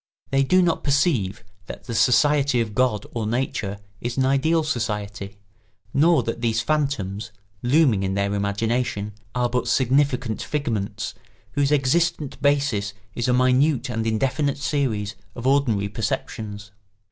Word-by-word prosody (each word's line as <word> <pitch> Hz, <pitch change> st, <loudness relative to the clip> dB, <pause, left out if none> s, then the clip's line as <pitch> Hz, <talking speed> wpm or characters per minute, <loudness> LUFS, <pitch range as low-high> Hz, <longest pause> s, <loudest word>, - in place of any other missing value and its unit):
They 135 Hz, 0 st, +3 dB
do 185 Hz, +7 st, +4 dB
not 170 Hz, -2 st, 0 dB
perceive 135 Hz, -, +1 dB, 0.2 s
that -, -, -8 dB
the 120 Hz, -, -6 dB
society 140 Hz, +3 st, +3 dB
of 110 Hz, -2 st, -1 dB
God 120 Hz, -4 st, +1 dB
or 115 Hz, -3 st, -2 dB
Nature 110 Hz, -4 st, -2 dB, 0.2 s
is 120 Hz, +4 st, -4 dB
an 130 Hz, -, +3 dB
ideal 155 Hz, +5 st, +2 dB
society, 105 Hz, -7 st, -3 dB, 0.6 s
nor 165 Hz, +4 st, +4 dB
that 115 Hz, 0 st, -4 dB
these 115 Hz, -1 st, +1 dB
phantoms, 115 Hz, -6 st, -1 dB, 0.3 s
looming 125 Hz, -5 st, +3 dB
in 95 Hz, 0 st, -1 dB
their 100 Hz, 0 st, 0 dB
imagination, 105 Hz, +1 st, -1 dB, 0.2 s
are 125 Hz, -1 st, +2 dB
but 125 Hz, +1 st, -1 dB
significant 130 Hz, -3 st, +1 dB
figments 115 Hz, -9 st, -3 dB, 0.4 s
whose 140 Hz, +4 st, +1 dB
existent 150 Hz, +2 st, +1 dB
basis 135 Hz, -8 st, +1 dB, 0.2 s
is 120 Hz, -, -2 dB
a 125 Hz, -, +3 dB
minute 130 Hz, +3 st, +3 dB
and 115 Hz, -1 st, -2 dB
indefinite 135 Hz, +6 st, 0 dB
series 125 Hz, -8 st, -1 dB, 0.2 s
of 120 Hz, -, -7 dB
ordinary 130 Hz, -7 st, +2 dB
perceptions. 105 Hz, -1 st, -4 dB
125 Hz, 135 wpm, -23 LUFS, 105-140 Hz, 0.6 s, do